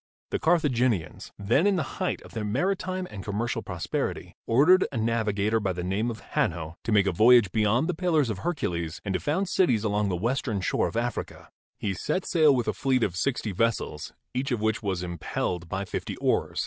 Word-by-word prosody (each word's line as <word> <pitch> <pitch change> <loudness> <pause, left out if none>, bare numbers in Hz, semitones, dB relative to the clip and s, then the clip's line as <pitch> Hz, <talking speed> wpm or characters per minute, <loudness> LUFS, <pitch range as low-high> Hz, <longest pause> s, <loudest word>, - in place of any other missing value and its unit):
the - - 0
Carthaginians, 130 - +1
then 120 - +2
in 200 - +3
the 160 -6 -4
height - - -1
of - - -14
their 110 - -3
maritime 185 - -1
and 100 -2 -7
commercial 115 +4 -2
prosperity, 85 -7 -4
ordered 160 +11 +5
a 135 - -4
navigator 110 -1 +1
by 95 -3 -1
the 90 0 -4
name 100 +6 -1
of 110 -3 -6
Hanno 80 -1 -1
to 115 - -2
make 100 -2 +4
a 95 - +2
voyage 110 +1 +6
beyond 110 +8 +2
the 180 - 0
Pillars 160 -6 +1
of 100 - -5
Hercules 85 - -2
and 95 - -1
to 90 - 0
found 185 +7 -1
cities 125 - +2
along 105 -1 +1
the 90 - 0
western 115 +2 -1
shore 95 - 0
of« - - -5
Africa. 120 +1 -4 0.3
He 100 - -2
set 185 - -2
sail 155 -5 +4
with 120 -2 -1
a - - +1
fleet 130 -3 +1
of 90 - -1
sixty 115 +2 -1
vessels, 105 -7 -1 0.2
each 130 +2 -1
of 120 -4 0
which 110 +1 0
was 95 -4 -2
impelled 85 0 -3
by 100 0 -2
fifty - - -5
oars. - - 0
110 Hz, 200 wpm, -27 LUFS, 95-135 Hz, 0.3 s, voyage